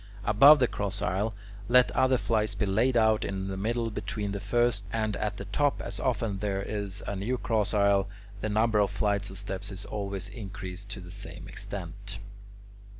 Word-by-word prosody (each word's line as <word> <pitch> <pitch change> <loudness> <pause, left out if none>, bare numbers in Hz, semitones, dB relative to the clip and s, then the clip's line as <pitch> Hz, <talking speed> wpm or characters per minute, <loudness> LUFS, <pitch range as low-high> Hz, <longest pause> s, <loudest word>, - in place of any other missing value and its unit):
Above 135 +9 +8
the 130 - +4
cross 100 -1 -3
aisle, 100 +3 -1 0.3
let 125 0 +6
other 130 0 +3
flights 110 -2 0
be - - 0
laid 115 +6 +2
out 110 -1 +4
in 95 0 -3
the 95 - -3
middle 115 +3 -1
between 105 0 -3
the 100 - -3
first; 115 +1 +1
and 110 -1 0
at 105 -1 -2
the 100 - -6
top, 140 +9 +1
as 100 0 -5
often 115 -5 0
as - - -8
there 100 -2 -1
is 100 -2 -4
a 100 - -3
new 110 +7 -1
cross 110 -4 0
aisle, 100 -1 +3 0.3
the 110 - -2
number 110 +1 +3
of 100 -1 +3
flights 100 0 0
of 95 - -8
steps 100 +1 -4
is 95 +1 -5
always 100 -2 -4
increased 100 -3 -7
to 105 -1 -6
the 90 0 -10
same 90 -3 -8
extent. 100 0 -5
100 Hz, 195 wpm, -29 LUFS, 100-110 Hz, 0.3 s, Above